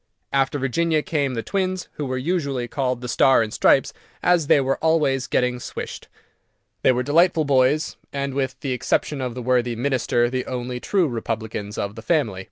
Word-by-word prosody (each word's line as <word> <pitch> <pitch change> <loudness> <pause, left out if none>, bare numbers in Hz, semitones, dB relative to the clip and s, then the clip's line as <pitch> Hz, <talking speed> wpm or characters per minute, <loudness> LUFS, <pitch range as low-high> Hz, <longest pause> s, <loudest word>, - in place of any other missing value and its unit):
After 135 +1 +1
Virginia 155 +4 0
came 140 -5 -1
the 115 - -3
twins, 185 -2 -2
who 145 - -4
were 130 0 -2
usually 140 -4 -1
called 125 -1 -2
"The 125 - -5
Star 125 0 +4
and 110 - -6
Stripes," - - +3 0.3
as 175 -4 +3
they - - +5
were 135 0 0
always 150 -5 +2
getting 125 0 0
swished. - - -7 0.7
They - - +5
were 125 0 0
delightful 160 +3 +3
boys, 140 +2 +2
and, 140 -1 -3
with 135 -1 -2
the 135 - -2
exception 135 +3 -1
of 125 -2 -3
the 125 - -5
worthy 125 -1 +1
Minister, 120 -1 +1
the 130 +1 -3
only 125 0 -4
true 185 +4 +1
republicans 110 -3 -4
of 100 0 -3
the 110 - -9
family. 120 - 0
130 Hz, 180 wpm, -23 LUFS, 125-150 Hz, 0.7 s, they